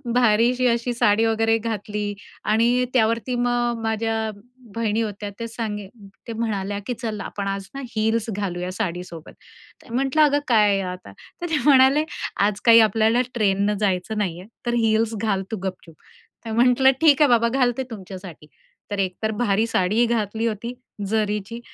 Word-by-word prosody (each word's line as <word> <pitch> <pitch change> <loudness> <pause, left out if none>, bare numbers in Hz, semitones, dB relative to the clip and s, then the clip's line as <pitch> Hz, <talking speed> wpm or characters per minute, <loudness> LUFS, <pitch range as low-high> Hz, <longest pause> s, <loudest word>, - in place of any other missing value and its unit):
भारीशी 245 +2 +3
अशी 235 +1 0
साडी 225 -1 +3
वगैरे 225 0 +2
घातली 210 -2 -3 0.4
आणि 240 +3 +3
त्यावरती 230 0 +1
मग 240 -1 0
माझ्या 225 0 -1 0.4
बहिणी 225 -1 0
होत्या, 205 -2 -4
ते 230 - -3
सांगी 215 -3 -5 0.4
ते 230 - -4
म्हणाल्या 205 -3 -2
की 250 - -1
"चल 220 -3 -3
आपण 200 0 -5
आज 195 0 -3
ना 275 - -6
हील्स 220 +1 0
घालूया 180 -3 -3
साडीसोबत." 180 -4 -5 0.5
तर 240 - -15
म्हटलं, 270 +4 +1
"अगं 290 -1 +3
काय 210 -4 +4
हे 195 - 0
आता." 180 - -10 0.3
तर 350 - -2
ते 315 - +1
म्हणाले, 275 +1 +6 0.3
"आज 200 0 +1
काही 230 -1 +8
आपल्याला 220 +2 +3
ट्रेनने 205 -2 +1
जायचं 195 0 -1
नाहीये, 185 -3 -3 0.2
तर 240 - 0
हील्स 225 -1 +2
घाल 200 -4 0
तू 220 - -2
गपचूप." 185 -4 -6 0.5
तर 225 - -5
म्हटलं, 250 +3 +4
"ठीक 305 -3 +5
आहे 295 - +6
बाबा, 235 -1 +4
घालते 255 0 +1
तुमच्यासाठी." 185 -6 -9 0.4
तर 205 - -2
एकतर 195 +3 -1
भारी 210 0 +2
साडीही 215 +2 +2
घातली 225 -1 -1
होती 230 +2 -4 0.4
जरीची 210 +1 -1
220 Hz, 155 wpm, -23 LUFS, 205-235 Hz, 0.5 s, काही